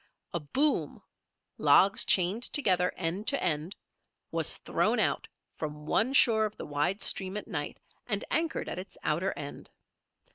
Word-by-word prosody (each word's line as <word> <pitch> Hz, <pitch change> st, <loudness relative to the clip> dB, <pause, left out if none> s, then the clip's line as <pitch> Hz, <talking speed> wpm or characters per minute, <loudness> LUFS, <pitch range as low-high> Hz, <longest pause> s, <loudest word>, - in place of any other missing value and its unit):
A 170 Hz, -, -1 dB
"boom", 270 Hz, -, 0 dB, 0.6 s
logs 195 Hz, +1 st, +4 dB
chained 185 Hz, +5 st, +3 dB
together, 185 Hz, -10 st, +1 dB
end 185 Hz, +5 st, -3 dB
to 280 Hz, -, 0 dB
end, 165 Hz, +2 st, -1 dB, 0.6 s
was -, -, +4 dB
thrown -, -, 0 dB
out -, -, 0 dB, 0.3 s
from 150 Hz, -1 st, -6 dB
one 225 Hz, -, +1 dB
shore 225 Hz, -5 st, +5 dB
of 210 Hz, -, -6 dB
the -, -, -7 dB
wide 150 Hz, +7 st, -1 dB
stream 190 Hz, +1 st, +1 dB
at 210 Hz, -, -7 dB
night, 160 Hz, -9 st, -5 dB, 0.3 s
and 205 Hz, -3 st, -2 dB
anchored 325 Hz, 0 st, -1 dB
at -, -, -5 dB
its 185 Hz, -, -11 dB
outer 170 Hz, +6 st, 0 dB
end. 145 Hz, -1 st, -8 dB
190 Hz, 150 wpm, -29 LUFS, 160-220 Hz, 0.6 s, shore